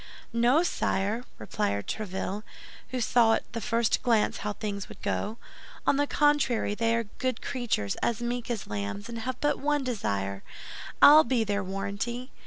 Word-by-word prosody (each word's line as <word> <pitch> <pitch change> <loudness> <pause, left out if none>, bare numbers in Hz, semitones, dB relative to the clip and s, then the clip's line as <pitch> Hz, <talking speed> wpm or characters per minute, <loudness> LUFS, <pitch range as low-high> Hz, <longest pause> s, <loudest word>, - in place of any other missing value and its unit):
"No, 245 +7 +4
sire," 220 - -1
replied 100 -1 -2
Tréville, 195 -1 -3 0.5
who 255 - -2
saw 230 -1 +4
at - - -3
the 230 - -3
first 230 +1 +1
glance 230 -3 +2
how 210 0 -3
things 200 -2 -5
would - - -11
go, 210 +2 -2 0.5
"on 275 - +3
the 290 0 +2
contrary, 290 -9 +2
they 230 +1 +1
are 230 - +1 0.2
good 255 -1 -1
creatures, 220 - -1
as 235 -2 0
meek 240 0 -3
as 230 -4 -2
lambs, 100 -1 -4
and 230 - -5
have 255 +3 -4
but 295 0 +1
one 290 +1 +1
desire, 100 - -2 0.6
I'll 305 +2 +10
be 235 -1 +1
their 205 -1 -1
warranty. 200 +6 -4
230 Hz, 165 wpm, -28 LUFS, 200-250 Hz, 0.6 s, I'll